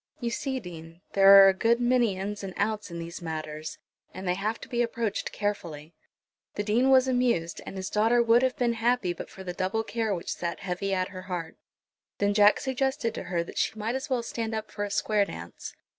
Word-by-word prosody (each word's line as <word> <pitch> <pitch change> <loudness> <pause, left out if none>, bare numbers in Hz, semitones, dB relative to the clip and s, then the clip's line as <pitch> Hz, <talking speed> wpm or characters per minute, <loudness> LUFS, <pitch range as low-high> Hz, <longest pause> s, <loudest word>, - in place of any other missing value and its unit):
You 235 -2 -2
see, 265 +2 -2
Dean, 165 -4 -11
there 195 0 +9
are - - +8
a - - +3
good 230 +5 +2
many 240 -5 +2
in's 205 +2 -4
and 190 -2 -6
out's 210 0 -1
in 170 - -7
these 170 +2 -7
matters, 155 -1 -5 0.4
and 185 0 -6
they 180 - +2
have 215 +4 -2
to - - -8
be 240 -1 -1
approached 230 -3 -2
carefully." 170 -7 -4 0.6
The 205 - -1
Dean 230 +6 +2
was 260 -1 +5
amused, 245 -10 0
and 195 - -7
his 190 0 -4
daughter 225 +3 +3
would 235 0 +5
have 260 -1 0
been 240 -1 +1
happy, 230 -5 +1
but - - -8
for 190 - -10
the 180 -1 -5
double 190 +5 -1
care 225 -2 -1
which 170 - -4
sat 170 -1 -4
heavy 195 +1 -3
at 185 -1 0
her 185 -1 -8
heart. 170 -3 -4 0.6
Then 205 0 +1
Jack 205 0 +5
suggested 265 -3 -1
to - - -6
her 170 -2 -1
that - - -6
she - - 0
might 220 +2 -2
as 265 +3 -4
well 250 -3 0
stand 225 -1 -3
up 220 0 -5
for 205 - -4
a 205 - -3
square 205 0 +1
dance. 85 - -9
205 Hz, 220 wpm, -27 LUFS, 180-235 Hz, 0.6 s, there